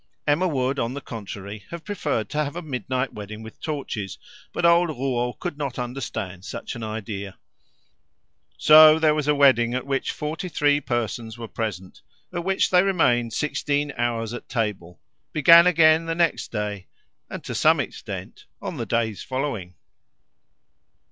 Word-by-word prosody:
Emma 155 +5 +2
would, 135 -3 -1
on 120 +2 -2
the - - -3
contrary, 100 -4 -8
have 170 -1 -7
preferred 155 - -2
to 150 0 -1
have 145 +2 -5
a 175 - -4
midnight 130 -2 -3
wedding 105 +1 -8
with 110 - -12
torches, 135 - -4 0.3
but 170 - -1
old 170 0 +5
Rouault 125 -3 -1
could 165 -5 -5
not 140 -3 -3
understand 115 -7 -5
such 95 - -6
an 120 - -7
idea. 105 -3 -5 1.2
So 155 0 +8
there 155 -1 +3
was 150 -1 -2
a 150 - +3
wedding 125 -4 +4
at 130 - -3
which 135 -1 -1
forty 160 +5 -4
three 145 -2 +2
persons 115 -2 -3
were 115 -1 -7
present, 100 -5 -5 0.3
at 175 -1 -3
which 190 +1 +1
they 180 -1 +6
remained 120 - +2
sixteen 145 -1 -1
hours 115 -1 -1
at 120 - -8
table, 95 - -3 0.3
began 170 +3 +8
again 165 -1 +5
the 165 - -1
next 170 -1 0
day, 105 -3 -4 0.4
and - - -7
to - - -5
some - - +4
extent - - -6
on - - -5
the - - -4
days 110 -4 -1
following. 120 - -4
130 Hz, 160 wpm, -24 LUFS, 110-155 Hz, 1.2 s, So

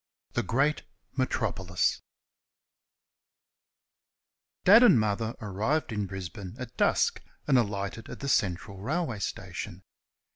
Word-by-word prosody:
THE 120 - +1
GREAT 135 +8 +1 0.3
METROPOLIS 100 -8 0 2.6
Dad 210 +6 +9
and 240 - +7
Mother 110 +2 -1
arrived 110 +9 -1
in 105 -2 -2
Brisbane 95 0 -7
at 125 -1 -8
dusk - - +2 0.2
and 140 - +3
alighted 105 -1 -1
at - - -8
the 140 - -4
Central 95 -5 0
railway 135 - -2
station. 95 -1 -5
110 Hz, 105 wpm, -29 LUFS, 95-130 Hz, 2.6 s, Dad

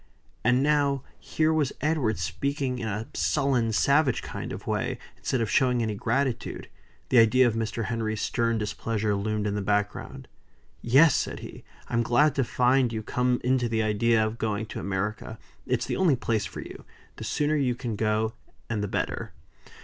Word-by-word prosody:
And 125 +3 +3
now 140 -2 +2 0.2
here 160 0 +1
was 150 -4 +1
Edward 145 -8 0
speaking 130 - -2
in 115 - -3
a 105 +2 -3
sullen, 125 -5 +1
savage 140 +3 +2
kind - - -6
of - - -7
way, - - -1 0.2
instead 130 - -1
of 110 - -1
showing 125 -3 +3
any 110 -1 -1
gratitude. 120 +3 -2 0.4
The 125 - +6
idea 115 +3 +5
of 120 - +2
Mr. 115 0 -2
Henry's 110 -2 -2
stern 115 -1 0
displeasure 105 0 -1
loomed 105 +1 -1
in 105 - 0
the 105 - -2
background. 105 +1 -2 0.5
"Yes!" 135 +6 +6
said - - -2
he, - - -10 0.2
"I'm 120 -1 +1
glad 125 +5 +3
to 135 - +1
find 125 +1 +2
you 110 -1 -4
come 125 +2 0
into 125 -1 +1
the 110 -1 +1
idea 110 +1 +2
of 110 +2 -4
going 110 -1 -1
to - - -4
America. 105 +3 -3 0.3
It's 125 -2 0
the - - -2
only 180 -7 +4
place 110 -4 -1
for - - -8
you. - - -10 0.3
The - - -7
sooner 150 +1 0
you 130 -5 +1
can 115 -2 -4
go, 110 +1 0 0.4
and 105 -3 -1
the - - -1
better." - - -3
115 Hz, 180 wpm, -27 LUFS, 110-130 Hz, 0.5 s, The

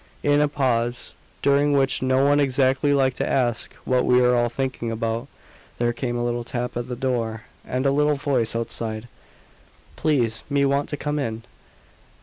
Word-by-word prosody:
In 145 0 +3
a 150 - +4
pause 120 -4 -1 0.3
during 145 +1 +3
which 135 -1 +2
no 130 +1 +2
one 145 +1 +4
exactly 135 +1 +2
liked 135 -2 +2
to - - -1
ask 120 -4 0
what 130 -1 +2
we 125 0 +4
were 125 0 +4
all 120 0 +2
thinking 130 -1 -3
about 115 +2 -2 0.5
there 120 0 +1
came 120 0 -3
a 120 - -1
little 120 0 -1
tap 125 +1 -4
at 120 0 -3
the 125 - -4
door, 115 -3 -2 0.2
and 130 +2 -2
a 135 - +4
little 150 +1 +2
voice 135 -5 0
outside. 115 -1 -3 0.9
"Please, 120 -7 +1
me 140 -1 +2
want 140 +1 +1
to 145 - -3
come 150 0 -2
in." 115 -4 -3
130 Hz, 175 wpm, -23 LUFS, 120-140 Hz, 0.9 s, a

